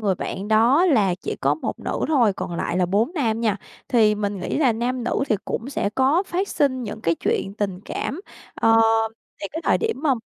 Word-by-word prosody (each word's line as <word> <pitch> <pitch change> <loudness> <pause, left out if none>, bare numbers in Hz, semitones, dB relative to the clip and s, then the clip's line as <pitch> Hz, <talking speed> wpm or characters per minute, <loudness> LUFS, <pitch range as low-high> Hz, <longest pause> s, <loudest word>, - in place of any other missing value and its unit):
người 200 -3 +1
bạn 195 +3 -5
đó 235 +10 +4
là 210 - +3
chỉ 185 - -5
có 140 +2 +2
1 155 - -5
nữ - - -3
thôi, 245 -10 +3
còn 175 - -5
lại 170 - -2
là 180 -1 +2
4 210 - +1
nam 230 -8 0
nha. 215 -4 +1 0.3
Thì 220 -4 +4
mình 205 -2 -3
nghĩ - - -2
là 265 -6 +4
nam 240 +2 -2
nữ 245 - 0
thì 215 - +2
cũng 245 +5 -4
sẽ 205 - -1
có 275 +8 +3
phát 375 +3 -2
sinh 260 -3 0
những 220 -1 -6
cái 165 -5 +1
chuyện 195 +4 -2
tình 195 -3 -2
cảm. 300 - -4 0.3
Ờ, 225 0 +4 0.6
thì 200 - -3
cái 320 - -4
thời - - +3
điểm 450 0 -1
mâm 275 -6 +2
225 Hz, 220 wpm, -23 LUFS, 200-270 Hz, 0.6 s, đó